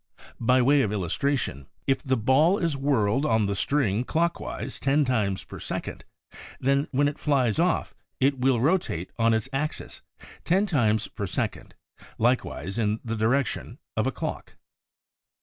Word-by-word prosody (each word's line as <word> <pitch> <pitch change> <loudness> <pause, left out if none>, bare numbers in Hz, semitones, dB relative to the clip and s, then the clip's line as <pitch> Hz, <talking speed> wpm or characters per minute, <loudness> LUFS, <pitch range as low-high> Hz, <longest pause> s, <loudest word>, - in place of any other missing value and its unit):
By 125 +2 +3
way 140 +2 +5
of 105 - 0
illustration 100 - -1
— - - -43
if 135 -1 +1
the 130 -1 0
ball 140 - +4
is 165 -6 0
whirled 135 -3 +1
on 110 -7 +2
the 100 - -1
string 110 0 +1
clockwise 165 -3 -2
ten 140 +2 +2
times 105 -7 0
per - - -10
second, - - -5 0.5
then 140 +2 +1
when 145 +2 +2
it 145 - -4
flies 130 -6 +1
off, 180 +1 +1 0.3
it 135 0 +2
will 125 -1 +3
rotate 135 - 0
on 115 0 +4
its 110 +2 0
axis 150 +3 -3 0.4
ten 190 +4 +2
times 110 - +1
per 100 - -5
second, - - -4 0.4
likewise 115 - 0
in 105 0 0
the 115 0 -2
direction 115 +3 0 0.2
of - - +1
a - - +1
clock. - - -5
130 Hz, 155 wpm, -26 LUFS, 110-145 Hz, 0.5 s, way